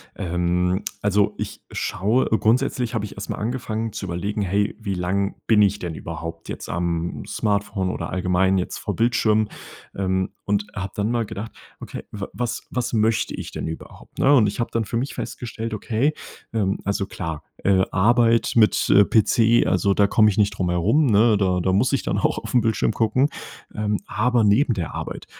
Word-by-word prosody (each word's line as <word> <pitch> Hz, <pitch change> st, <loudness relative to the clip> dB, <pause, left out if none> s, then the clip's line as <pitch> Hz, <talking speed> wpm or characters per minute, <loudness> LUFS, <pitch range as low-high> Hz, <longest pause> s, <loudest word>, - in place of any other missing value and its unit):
Ähm, 90 Hz, +1 st, 0 dB, 0.2 s
also, 105 Hz, 0 st, +2 dB
ich -, -, -5 dB
schaue 110 Hz, +7 st, 0 dB
grundsätzlich 120 Hz, +2 st, +1 dB
habe 110 Hz, -2 st, -1 dB
ich 105 Hz, -, -8 dB
erst 100 Hz, -, -7 dB
mal -, -, -3 dB
angefangen 115 Hz, -1 st, -3 dB
zu 105 Hz, -, -5 dB
überlegen: 100 Hz, +4 st, -3 dB
„Hey, 100 Hz, +2 st, 0 dB
wie 100 Hz, -3 st, -3 dB
lang 100 Hz, +3 st, -1 dB
bin 110 Hz, -2 st, +5 dB
ich 100 Hz, 0 st, +3 dB
denn 85 Hz, -3 st, -5 dB
überhaupt 85 Hz, +1 st, -7 dB
jetzt -, -, -6 dB
am 85 Hz, 0 st, -2 dB
Smartphone 100 Hz, -2 st, -1 dB
oder -, -, -4 dB
allgemein 95 Hz, +1 st, +1 dB
jetzt 90 Hz, -, -2 dB
vor -, -, -3 dB
Bildschirmen?“ 110 Hz, -2 st, +2 dB, 0.5 s
Ähm, 95 Hz, -1 st, -1 dB
und 105 Hz, 0 st, 0 dB
hab 100 Hz, -1 st, -4 dB
dann 105 Hz, +2 st, 0 dB
mal 120 Hz, -1 st, 0 dB
gedacht: 105 Hz, +2 st, -6 dB, 0.3 s
„Okay, -, -, -7 dB
w 100 Hz, -2 st, -5 dB
was 120 Hz, -1 st, -3 dB
was 125 Hz, -1 st, -2 dB
möchte 110 Hz, 0 st, +1 dB
ich -, -, -7 dB
denn -, -, -4 dB
überhaupt“, 80 Hz, -, -10 dB
ne? 140 Hz, -, +5 dB
Und 115 Hz, -6 st, +5 dB
ich 100 Hz, +4 st, -4 dB
habe 120 Hz, -, -1 dB
dann 115 Hz, -1 st, 0 dB
für 115 Hz, +3 st, -2 dB
mich 130 Hz, +4 st, -2 dB
festgestellt: 115 Hz, -2 st, -5 dB
„Okay, 115 Hz, +7 st, 0 dB, 0.4 s
ähm, 100 Hz, -3 st, 0 dB
also 100 Hz, 0 st, 0 dB
klar, 80 Hz, -5 st, -5 dB, 0.2 s
äh, 95 Hz, -1 st, +4 dB
Arbeit 115 Hz, +4 st, +3 dB
mit, 110 Hz, -2 st, +3 dB
äh, 100 Hz, +1 st, +7 dB
PC, 115 Hz, +2 st, +3 dB
also, 95 Hz, +1 st, +2 dB
da 100 Hz, 0 st, +3 dB
komme 110 Hz, +1 st, +4 dB
ich 105 Hz, -, -2 dB
nicht 105 Hz, -1 st, +2 dB
drum 90 Hz, -2 st, 0 dB
herum, 100 Hz, -, +2 dB
ne, 110 Hz, 0 st, +4 dB
da 90 Hz, -2 st, +1 dB
da 95 Hz, +1 st, +1 dB
muss 105 Hz, +7 st, +2 dB
ich -, -, +1 dB
dann -, -, -1 dB
auch -, -, +1 dB
auf -, -, -8 dB
'n 125 Hz, -, +5 dB
Bildschirm 110 Hz, -3 st, +1 dB
gucken.“ 125 Hz, +5 st, +2 dB, 0.5 s
Ähm, 105 Hz, -1 st, -1 dB
aber 120 Hz, 0 st, +1 dB
neben 115 Hz, +5 st, +3 dB
der 90 Hz, -7 st, -4 dB
Arbeit -, -, -6 dB
105 Hz, 190 wpm, -23 LUFS, 95-115 Hz, 0.5 s, äh